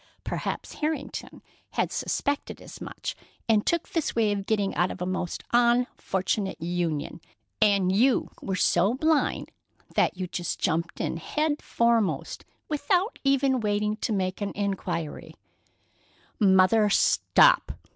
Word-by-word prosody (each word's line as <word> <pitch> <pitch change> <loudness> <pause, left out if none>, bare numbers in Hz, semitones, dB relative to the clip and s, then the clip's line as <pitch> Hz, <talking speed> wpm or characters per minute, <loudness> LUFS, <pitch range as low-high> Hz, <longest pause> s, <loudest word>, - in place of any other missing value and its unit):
Perhaps - - -4
Harrington 300 -2 -4 0.3
had - - 0
suspected 285 0 -2
as - - -12
much - - -5 0.3
and 215 -2 +2
took 340 -1 +1
this 330 -3 -1
way 220 -3 +2
of 200 -1 -3
getting 205 -3 0
out 175 +1 +1
of - - -7
a 180 - -2
most 180 -1 -3
unfortunate 235 -6 +1
union, 165 -3 -2 0.4
and 195 -3 +3
you 250 +5 +3
were 190 - -2
so 185 +4 +2
blind 310 +2 +1 0.4
that - - +2
you 185 - -2
just 175 -1 -3
jumped 170 +1 -1
in - - -2
head 300 - -1
foremost, 235 -3 0 0.2
without 355 +8 0
ever 275 -1 +3
waiting 210 -1 0
to 225 - -3
make 190 -1 -1
an 200 - -2
inquiry——" 195 -6 -3 1.0
"Mother, 200 +1 +5
stop!" - - +4
210 Hz, 130 wpm, -26 LUFS, 185-260 Hz, 1.0 s, Mother